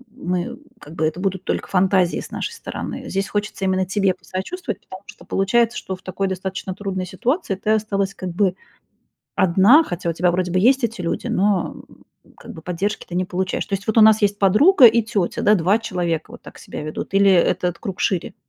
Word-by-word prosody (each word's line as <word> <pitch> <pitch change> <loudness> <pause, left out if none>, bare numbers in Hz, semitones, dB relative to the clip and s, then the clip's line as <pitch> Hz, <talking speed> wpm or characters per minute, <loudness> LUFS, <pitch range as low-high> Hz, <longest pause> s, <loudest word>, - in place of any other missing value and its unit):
мы 180 -4 -3 0.2
как 155 +2 -12
бы 160 -2 0
это 160 +3 -2
будут 190 -1 -2
только - - -2
фантазии 185 -1 +2
с - - -9
нашей - - -4
стороны. 460 - -7
Здесь 195 0 -1
хочется 205 -1 -3
именно 190 0 +1
тебе 195 0 +1
посочувствовать, 220 - -5
потому 185 +1 -12
что - - -14
получается, 230 +5 +1
что 190 - -5
в 185 - -18
такой 195 +1 -3
достаточно 190 0 -4
трудной 190 -2 -4
ситуации 205 - -2
ты 210 +3 -2
осталась 200 -2 0
как 185 - -5
бы 185 0 +1 0.8
одна, 195 - +5
хотя 175 - -3
у - - -1
тебя 175 +2 +1
вроде 180 0 -1
бы 185 - +2
есть 255 +6 +4
эти 230 -3 -3
люди, 170 - -3
но, 195 -2 0
м, - - -20 0.3
как - - -11
бы 160 - -10
поддержки 190 +5 -3
ты 175 - -7
не 185 +1 0
получаешь. 185 +1 -2
То 195 - -2
есть 200 +1 -5
вот 220 - -1
у - - +8
нас 220 0 +6
есть 205 0 +2
подруга 245 - +6
и 230 +1 +5
тётя, 210 -5 -2
да, 210 +1 +5
2 190 +4 +2
человека 175 -3 -3
вот 240 - -12
так - - -13
себя 190 - -8
ведут, 155 +5 -6
или 195 0 +5
этот 180 -1 +2
круг 190 -2 -6
шире? 185 -4 -1
190 Hz, 210 wpm, -21 LUFS, 180-210 Hz, 0.8 s, у